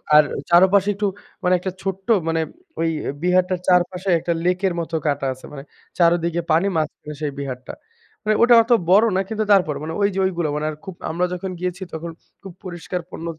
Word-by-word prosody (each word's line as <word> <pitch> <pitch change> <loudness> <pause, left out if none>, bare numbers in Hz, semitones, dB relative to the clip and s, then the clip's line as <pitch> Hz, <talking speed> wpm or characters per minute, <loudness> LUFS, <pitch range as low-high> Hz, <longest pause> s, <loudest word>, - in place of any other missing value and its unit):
আর 150 - +9 0.3
চারপাশে 190 +3 +5
একটু 205 +1 0 0.4
মানে 180 - +3
একটা 190 +1 -3
ছোট্ট 195 +1 -4 0.2
মানে, 165 0 +1 0.4
ঐ - - 0 0.3
এ - - 0
বিহারটার 180 0 +2
চারপাশে 180 +1 +2
একটা 170 - -2
লেকের 180 +1 +1
মতো 165 0 -4
কাঁটা 140 -1 0
আছে, 130 - -14
মানে 135 -2 -8 0.3
চারদিকে 170 0 +2
পানি, 165 +5 +3
মাঝখানে 150 -1 -3
সেই 150 -2 -1
বিহারটা। 130 -2 -6 0.5
মানে 215 0 +2
ওটা 240 0 +7
অত 230 - -6 0.2
বড় 205 +5 +6
না 190 - +2
কিন্তু, 220 -1 -1
তারপরও 155 -8 +3
মানে 160 - -4
ঐযে 200 -1 +1
ঐগুলো 175 -4 -1
মানে 150 +1 -2
আর - - -8
খুব, 190 -2 -7
আমরা 170 +3 0
যখন 185 +1 -4
গিয়েছি 180 +1 -3
তখন 165 +1 -5 0.3
খুব 195 -2 -10
পরিষ্কার 180 -1 -5
পণ্য 165 - -8
180 Hz, 190 wpm, -21 LUFS, 160-190 Hz, 0.5 s, আর